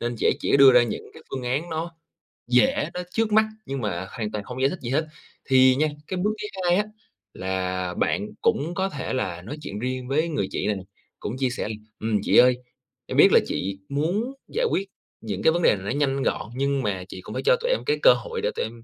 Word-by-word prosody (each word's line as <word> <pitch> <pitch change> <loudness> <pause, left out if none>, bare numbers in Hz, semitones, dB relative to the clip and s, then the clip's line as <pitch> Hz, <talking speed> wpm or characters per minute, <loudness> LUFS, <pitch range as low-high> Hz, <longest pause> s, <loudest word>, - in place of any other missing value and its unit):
nên 120 0 -2
chị - - +1
ấy - - +3
chỉ - - +3
đưa 135 -1 +8
ra 125 -1 +7
những 120 - -4
cái - - -13
phương 130 -1 -4
án 135 +8 -2
nó 165 +2 -3 0.6
dễ, 265 - +3
nó 180 - -3
trước 225 -1 0
mắt 220 +1 +5 0.2
nhưng 135 -2 -4
mà 95 -3 -3
hoàn 110 -4 -4
toàn 105 -1 -4
không 125 +3 -6
giải 135 - +4
thích 185 - -6
gì 120 - -4
hết. 155 +5 +1 0.4
Thì 130 -1 +6
nha, 155 +3 +2 0.2
cái 185 - -3
bước 210 - +2
thứ 210 - -3 0.2
hai 175 0 +4
á, 210 - +1 0.5
là 95 -1 -2
bạn - - 0
cũng 165 +5 +1
có 190 +1 0
thể 140 -7 -4
là 95 -9 -2
nói 115 +12 -7
chuyện 105 -7 -6
riêng 130 +1 -3
với 155 +5 +1
người 145 -11 -1
chị - - -2
này 105 - +1
nè, 95 - -7 0.4
cũng 115 +5 -4
chia 130 -1 +1
sẻ 125 - -3
là 110 - -3 0.2
"Ừm, 110 -1 0
chị - - +3
ơi, 125 0 +7 0.5
em - - -4
biết - - +8
là - - +7
chị 95 +1 -3
muốn 180 - -1
giải 485 +3 -1
quyết 195 +1 0 0.3
những 100 -4 -4
cái 160 - +5
vấn 175 - 0
đề - - +5
này 95 0 -8
nó - - -1
nhanh 135 -1 +1
gọn, - - -1
nhưng 140 0 0
mà 95 -3 -2
chị 95 - -8
cũng - - -9
phải - - -2
cho - - +6
tụi - - 0
em - - +2
cái 445 0 +1
cơ - - +9
hội 470 -2 -5
để 485 +2 0
tụi - - -1
em 115 +1 -10
130 Hz, 260 wpm, -25 LUFS, 110-175 Hz, 0.6 s, cơ